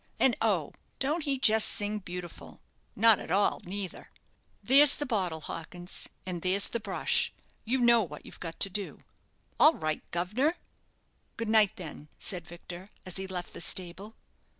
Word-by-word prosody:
And, 260 -3 +4
oh! 190 -10 +1 0.2
don't 300 +4 -1
he 275 -2 0
just 220 -4 +4
sing 210 +1 -1
beautiful 180 -2 -9 0.4
not 225 0 +6
at - - -8
all 200 +4 +2
neither." 190 0 -6 0.5
"There's 280 +3 +7
the 295 - -3
bottle, 185 - -1
Hawkins, 175 +3 -6 0.2
and 180 -2 -4
there's 190 +3 +2
the 235 - -2
brush. 205 -3 0 0.3
You 245 +4 +1
know 235 -1 +6
what 150 -7 -7
you've - - -12
got 165 -2 -7
to 195 - +6
do." 200 0 -4 0.6
"All 310 - +8
right, 155 -1 -2
guv'nor." 215 - 0 0.8
"Good 230 -1 -3
night, 215 -2 +4
then," 155 -6 -9
said 175 -4 -2
Victor, 175 +2 -10 0.2
as 185 -1 -1
he 190 0 -3
left 180 -2 -5
the - - -7
stable. 185 +5 -3
195 Hz, 160 wpm, -29 LUFS, 175-225 Hz, 0.8 s, All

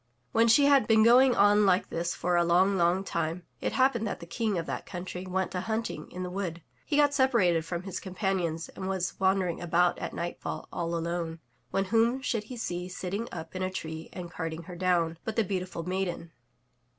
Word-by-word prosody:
When 230 +1 +4
she 255 +5 +6
had 280 -2 +5
been 220 -1 +5
going 245 +2 +6
on 205 +1 +5
like 185 0 +2
this 170 +1 -2
for 175 +1 0
a 175 - +4
long, 180 +4 +3
long 175 +1 +2
time, 170 -1 -2 0.2
it - - -2
happened 255 -4 +2
that - - -4
the 170 - -9
King 210 +3 -1
of 165 - -2
that - - -5
country 180 0 -6
went 190 0 -1
a 180 - -1
hunting 225 +3 -3
in 185 - -5
the 180 - -4
wood. 175 -4 -4 0.2
He 290 - +1
got 290 -1 +4
separated 220 - +3
from 175 +1 -4
his 190 -1 -5
companions 185 -4 -2
and 190 - -6
was 190 -2 -2
wan 190 0 +3
dering 180 -3 -2
about 175 +1 +2
at - - -5
nightfall 175 0 -4
all 170 -1 -2
alone, 165 0 -3 0.3
when 195 - 0
whom 230 +5 +2
should 235 -6 -2
he 250 +2 -8
see 180 -5 -4
sit 180 0 -5
ting 225 +4 -3
up 165 0 -8
in 185 - -3
a 185 - 0
tree 160 -3 -6
and 175 -2 -7
carding 165 -1 -4
her 175 +2 -9
down, 170 -2 +1
but 220 - -4
the 225 - +3
beautiful 185 -3 -3
maiden. 180 -3 -2
185 Hz, 215 wpm, -29 LUFS, 170-210 Hz, 0.3 s, she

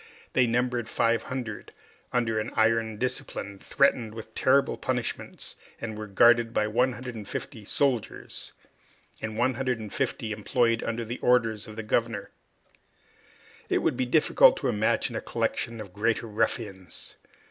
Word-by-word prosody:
They 130 -2 +4
numbered 120 0 0
500, 115 0 -1 0.4
under 115 -3 +1
an 110 +2 -3
iron 110 -1 +2
discipline, 115 -5 -3
threatened 120 -5 +2
with 110 0 -9
terrible 140 +1 +3
punishments, 125 -2 -4 0.2
and 110 -2 -5
were 110 0 -6
guarded 120 +3 +4
by 105 - +3
150 120 -2 -2
soldiers, 130 -1 -1 0.7
and 110 -1 -4
150 120 -3 -1
employed 115 +2 +1
under 115 0 -2
the 120 +3 -5
orders 115 -4 +2
of 110 - -9
the 110 - -5
governor. 110 -1 -1 1.4
It - - +1
would - - +2
be 130 - -1
difficult - - +5
to - - -1
imagine 105 +1 +1
a - - -2
collection 115 -1 -2
of 100 -4 -8
greater 115 +3 0
ruffians. 105 -4 -3
115 Hz, 125 wpm, -27 LUFS, 110-125 Hz, 1.4 s, difficult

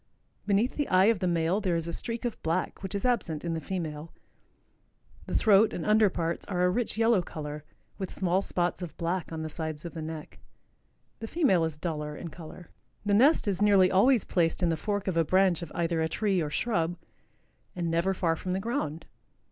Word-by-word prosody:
Beneath 210 +5 +1
the 290 - 0
eye 185 +1 +4
of 205 - -8
the 185 - 0
male 170 +3 +1
there 185 -4 0
is 165 0 -2
a 170 - -4
streak 230 +5 -4
of 240 - -3
black 165 +3 -2
which 190 +1 -5
is 200 - -2
absent 180 -11 0
in 170 - -1
the 160 - -3
female. 160 -3 -5 1.2
The - - -3
throat 215 0 +5
and 170 - -4
under 215 -1 +5
parts 170 -1 -2
are 180 -2 0
a 180 - +3
rich 230 +2 -1
yellow 225 -3 +4
color, 150 -3 -7 0.4
with 190 -2 -3
small 185 0 0
spots 180 -1 -1
of 175 -3 -7
black 170 0 -2
on 160 -1 -4
the - - -3
sides 160 0 -5
of 170 - -6
the 160 - -6
neck. 155 -1 -7 0.8
The 225 - -5
female 225 - +2
is 160 -2 -4
duller 150 -2 -4
in 170 - -6
color. 165 +1 -11 0.3
The 205 - +1
nest 255 +4 +4
is 195 -1 0
nearly 195 -3 +5
always 230 +4 +4
placed 170 0 +1
in 175 - +3
the 165 - +1
fork 205 +5 -3
of 180 -3 0
a 165 - +4
branch 185 +1 +3
of 165 -3 -7
either 165 -1 0
a 160 - 0
tree 195 +1 0
or 150 - -2
shrub 175 -1 -1 0.8
and 170 -2 -2
never 170 +4 +1
far 165 -3 +1
from 180 +3 -4
the 190 - 0
ground. 195 - -3
180 Hz, 210 wpm, -28 LUFS, 165-200 Hz, 1.2 s, throat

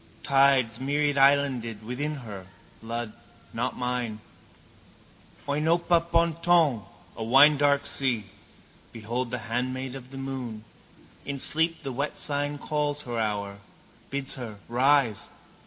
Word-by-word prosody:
Tides, 135 -5 +3
myriadislanded, 140 -5 +2
within 140 +7 -3
her, 100 -4 -9 0.3
blood 115 0 -5 0.4
not - - -2
mine, 125 -3 -2 1.3
oinopa 165 +4 +2
ponton, 165 -5 +3 0.3
a - - -8
winedark 140 +3 +5
sea. 120 -6 0 0.7
Behold 120 +3 -3
the 125 - -3
handmaid 130 +3 -3
of 130 -2 -9
the 135 - -9
moon. 130 -5 -5 0.6
In 140 -1 -5
sleep 160 +3 +2
the 135 - -4
wet 140 +4 -3
sign 145 0 -2
calls 150 0 -2
her 120 -2 -4
hour, 100 -2 -2 0.5
bids 140 -1 -1
her 115 -5 -6
rise. 130 -2 +2
135 Hz, 110 wpm, -26 LUFS, 115-145 Hz, 1.3 s, winedark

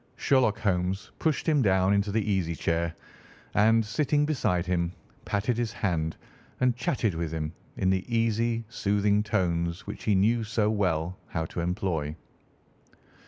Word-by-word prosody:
Sherlock 125 -6 +2
Holmes 95 -2 -1
pushed 160 0 0
him 150 -3 +4
down 95 -3 +3
into 100 0 +1
the 110 0 0
easy 95 -5 0
chair 85 +2 -1 0.6
and, 110 +1 +4
sitting 145 +7 +1
beside 105 - 0
him, 85 -1 0 0.3
patted 110 +4 0
his 120 -2 -1
hand 80 -7 -1 0.4
and 125 -2 +3
chatted 120 -4 0
with 80 -1 -3
him 80 0 -3 0.2
in 95 - +2
the 95 -1 +1
easy, 115 0 +1
soothing 105 -1 +1
tones 85 -4 -1
which 105 - -7
he 105 - +3
knew 110 +5 +3
so 110 0 +1
well 90 -4 0
how 80 -2 -2
to 85 - -6
employ. 85 -4 -1
100 Hz, 150 wpm, -28 LUFS, 85-115 Hz, 0.6 s, him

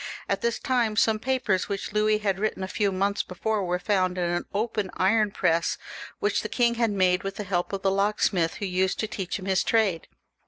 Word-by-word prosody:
At - - -1
this 235 0 0
time 240 -4 0
some 220 0 +3
papers 245 -6 0
which 195 -1 -4
Louis 215 0 +3
had 200 -3 -1
written 215 -2 -1
a - - -2
few 200 +1 0
months 200 +2 0
before 210 +3 -2
were 180 0 0
found 185 -2 0
in 180 - 0
an 175 0 -1
old 220 +3 -1 0.3
iron 210 +3 +3
press 165 -4 +1 0.4
which 415 0 0
the - - -5
king 240 -1 +2
had 230 -1 +1
made 185 -3 +2
with 195 0 -5
the 210 - -4
help 180 -2 -1
of 195 -1 -4
the 195 - +3
locksmith 195 -4 +1
who 205 - -4
used 185 0 0
to 220 - -1
teach 190 -4 -4
him 190 - -9
his 190 -2 +2
trade. 205 -8 +1
200 Hz, 220 wpm, -26 LUFS, 185-215 Hz, 0.4 s, some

